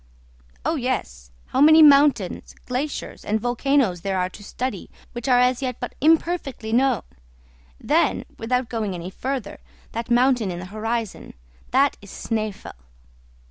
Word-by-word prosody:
"Oh, - - +1
yes; 65 -1 -3 0.2
how 265 - 0
many 315 +2 +8
mountains, 280 -9 +4
glaciers, 265 +4 -4
and 215 +1 0
volcanoes 245 -5 +1
there 195 0 -2
are 180 0 0
to 205 - -12
study, 235 -2 -5 0.2
which 240 +1 -6
are 250 -2 +5
as 250 +1 +2
yet 255 -3 -3
but 245 - -5
imperfectly 310 -7 +1
known! 255 -1 +2 0.8
Then, - - +1
without 250 +2 -1
going 215 -5 -3
any 175 +2 -6
further, 255 -2 -4 0.3
that 230 +1 -5
mountain 245 -3 +3
in 175 - -4
the 180 - -7
horizon. 225 0 -4 0.3
That 275 +1 +2
is 200 - -13
Snæfell." 215 -2 -4
240 Hz, 140 wpm, -23 LUFS, 205-265 Hz, 0.8 s, many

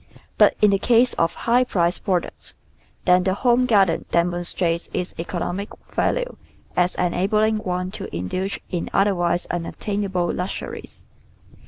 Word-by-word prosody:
But - - +6
in 210 - +7
the 195 - +2
case 240 +3 +4
of 165 0 0
high 245 +2 +4
priced 175 -7 0
j^roducts, 180 -3 -2 0.5
then 180 0 +5
the 190 0 +1
home 245 +2 +3
garden 195 -7 +3
demonstrates 175 0 0
its 180 0 -3
economic 175 +3 -3 0.2
value - - -1 0.4
as 180 0 +2
enabling 210 +5 +1
one 180 -3 -3
to - - -6
indulge 185 - -3
in 175 -2 -2
otherwise 175 -3 +2
unattainable 185 +1 -2
luxuries. 180 +2 -6
185 Hz, 130 wpm, -22 LUFS, 175-205 Hz, 0.5 s, in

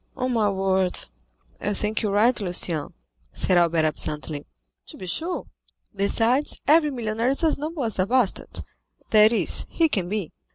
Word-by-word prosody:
"On 255 -1 -1
my 215 -3 +2
word, 190 -1 0 0.6
I 205 0 -2
think 210 +1 -1
you 215 - 0
are - - -2
right, 230 +3 +3
Lucien," 175 -5 0 0.4
said 185 - +1
Albert 170 -2 +3
absently. 150 -1 -4 0.4
"To - - -10
be 185 - -8
sure; 330 - -3 0.5
besides, 225 +7 +1
every 305 +1 +5
millionaire 230 -2 -1
is 275 +5 +1
as 315 -3 +2
noble 310 -1 -4
as 220 -4 -3
a 185 - +2
bastard—that 220 -2 +1
is, 235 - +1
he 330 - +2
can 185 -9 -1
be." 205 -5 -3
215 Hz, 160 wpm, -24 LUFS, 185-255 Hz, 0.6 s, every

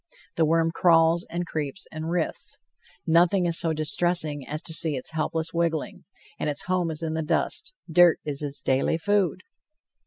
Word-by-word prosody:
The 165 - +3
worm 165 +1 +2
crawls 165 0 +3
and 175 +1 -3
creeps 155 +2 -4
and 155 +1 -5
writhes. 170 -1 +1 0.5
Nothing 175 +3 +3
is 170 -1 +1
so 165 - +1
distressing 155 -2 0
as 150 +1 -5
to 160 - -6
see 155 -1 +2
its 130 - -3
helpless 160 +1 -2
wiggling 165 -2 -2 0.3
and - - -1
its 145 - -3
home 180 -2 0
is 160 0 -5
in 160 -1 -2
the 160 - -1
dust; 155 - -1 0.2
dirt 175 0 +5
is 145 -1 -3
its 140 -2 -4
daily 135 +4 +1
food. 190 0 0
165 Hz, 175 wpm, -25 LUFS, 155-175 Hz, 0.5 s, dirt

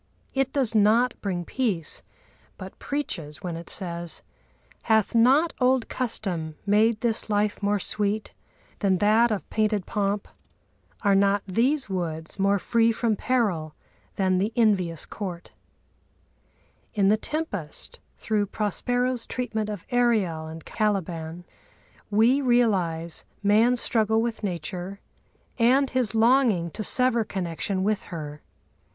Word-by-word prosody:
It 270 0 0
does 265 -6 0
not 225 +3 +4
bring 180 -4 -2
peace, 205 - -1 0.6
but - - -10
preaches, 165 - -4
when 175 -2 -3
it 170 0 -8
says: 170 -2 -2 0.7
Hath 220 0 +3
not 265 +8 +4
old 255 -2 +2
custom 180 -10 -2
made 215 +2 +3
this 230 -2 0
life 210 0 0
more 205 0 +1
sweet 205 +2 -2 0.5
Than 195 -3 +2
that 215 +4 +4
of 210 -3 -3
painted 215 -3 +1
pomp? 200 0 -1 0.8
Are 200 -2 +4
not 200 +1 +3
these 250 +9 +1
woods 170 -3 -4
More 200 +1 +3
free 230 +3 +2
from 225 -1 0
peril 195 -11 0 0.4
than 185 -1 +1
the 205 +4 0
envious 185 -8 +1
court? 180 -5 -7 1.4
In 200 -2 +3
the 210 - +5
Tempest, 215 - -4 0.2
through 210 -2 0
Prospero's 245 +4 -1
treatment 220 -4 -3
of 205 -5 -6
Ariel 215 -10 +1
and 160 0 -9
Caliban 175 -5 -2 0.7
we 230 +7 +4
realise 190 - +1 0.2
man's 225 +4 +4
struggle 220 -1 +2
with 230 0 -2
Nature 180 +1 -4 0.6
and 260 +4 +4
his 250 -4 0
longing 225 -7 +3
to 215 - -5
sever 250 +1 +3
connection 185 0 -3
with 210 +1 +1
her. 150 -3 -7
210 Hz, 125 wpm, -25 LUFS, 180-235 Hz, 1.4 s, the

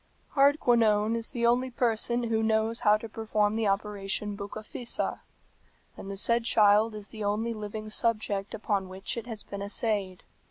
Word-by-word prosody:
"Hardquanonne 235 -6 +3
is 230 -1 -2
the 240 -4 -1
only 245 +2 +3
person 240 0 0
who 225 -1 0
knows 220 +1 +1
how 210 -3 +4
to 225 - -8
perform 215 -1 0
the 220 -1 0
operation 200 0 -2
Bucca 200 +1 -7
fissa, 235 +2 -3 0.8
and 195 - -9
the 200 - -4
said 235 +3 +3
child 215 0 +4
is 205 -2 -8
the 215 -1 -7
only 215 +3 -1
living 215 0 -6
subject 215 -2 -1
upon 200 -3 -2
which 190 +1 -4
it 235 0 -6
has 220 -3 -6
been 200 0 -7
essayed. 200 -2 -1
215 Hz, 165 wpm, -28 LUFS, 205-230 Hz, 0.8 s, how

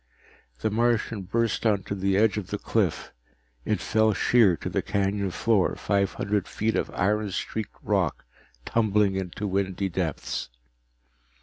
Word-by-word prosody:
The 110 - 0
Martian 115 -1 +1
burst 115 +4 -1
onto 100 -3 +1
the 95 0 +1
edge 110 -1 +4
of 105 -4 -4
the 105 - -3
cliff. 100 -5 -1 0.5
It 105 - 0
fell 110 +1 +2
sheer 110 -8 +4
to - - -6
the - - 0
canyon 100 0 0
floor, 105 +1 +1
five 100 -1 0
hundred 100 -1 -1
feet 110 +1 -1
of - - 0
iron 105 +2 +1
streaked 110 +2 -4
rock - - 0 0.4
tumbling 105 -3 +2
into 95 +2 -4
windy 95 0 -1
depths. 85 -8 -3
100 Hz, 140 wpm, -26 LUFS, 95-110 Hz, 0.5 s, edge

